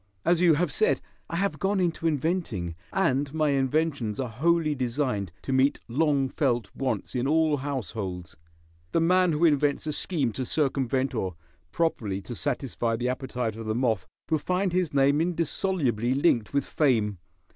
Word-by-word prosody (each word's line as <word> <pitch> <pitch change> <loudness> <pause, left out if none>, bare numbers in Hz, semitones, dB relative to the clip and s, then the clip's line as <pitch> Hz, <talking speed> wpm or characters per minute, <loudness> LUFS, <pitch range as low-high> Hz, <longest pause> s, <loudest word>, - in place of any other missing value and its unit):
As 175 0 +3
you 170 -3 +6
have 175 +4 0
said, 440 +3 +2 0.3
I - - -3
have 195 +3 -1
gone 195 0 +1
into 170 -2 0
inventing, 145 - -1 0.2
and 135 +2 +1
my 155 -1 +2
inventions 140 -4 0
are 130 -2 -2
wholly 155 +6 +2
designed 125 - -1
to 135 - -2
meet 130 +2 +3
long 140 +2 +2
felt 125 -6 -1
wants 135 -1 -2
in 125 +1 0
all 155 0 +3
households. 105 - -4 0.6
The - - +3
man 180 +2 +4
who 155 +2 +2
invents 145 -2 +2
a 155 - -2
scheme 145 -7 -1
to 130 - -4
circumvent 135 -1 0
or 95 -7 -2 0.4
properly 110 - -1
to 100 - -7
satisfy 120 -3 -1
the 125 +2 -1
appetite 125 -3 -3
of 115 -1 -7
the 110 - 0
moth 115 -5 0 0.2
will 155 - +3
find 180 +3 0
his 180 -3 +1
name 140 +2 +3
indissolubly 160 - 0
linked 130 -7 +2
with 140 -1 0
fame. 110 - +1
140 Hz, 165 wpm, -27 LUFS, 120-160 Hz, 0.6 s, you